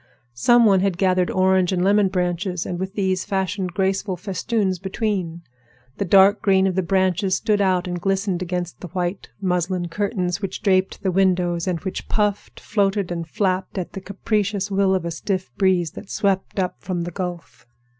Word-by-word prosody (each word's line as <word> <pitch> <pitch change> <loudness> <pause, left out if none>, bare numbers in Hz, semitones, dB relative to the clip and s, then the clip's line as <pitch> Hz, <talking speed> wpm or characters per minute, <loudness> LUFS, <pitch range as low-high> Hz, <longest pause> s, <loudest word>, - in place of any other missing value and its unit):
Some 240 - +4
one 195 -3 +5
had 190 -2 0
gathered 185 -1 +2
orange 185 -1 +2
and 180 -1 0
lemon 200 +1 +4
branches, 180 -1 -1
and 175 - -4
with 190 +2 -4
these 190 -2 0
fashioned 190 -2 -2
graceful 190 0 0
festoons 190 +1 -1
between. 190 -3 -3 0.6
The 200 - 0
dark 195 +3 +5
green 190 -1 +3
of 190 - +1
the 190 - +1
branches 185 +1 +1
stood 210 -3 +1
out 185 -2 +1
and 175 -1 -4
glistened 195 -1 0
against 180 -1 -3
the 180 - -7
white 180 +2 -3
muslin 180 -2 -1
curtains 195 -1 -2
which 195 - -5
draped 190 -1 +1
the 190 - +1
windows, 180 -2 +1
and 180 -2 0
which 190 - -5
puffed, 210 -1 -1
floated, 200 -3 0
and 170 -1 -4
flapped 185 +2 -1
at 180 - -3
the 195 - -6
capricious 200 0 -1
will 195 -1 +3
of 185 - -2
a 170 - -2
stiff 185 - -3
breeze 185 -4 +2
that - - -11
swept 195 -3 -1
up 185 -2 -1
from 180 -2 -3
the 175 - -5
Gulf. 175 -6 -6
190 Hz, 180 wpm, -22 LUFS, 180-195 Hz, 0.6 s, one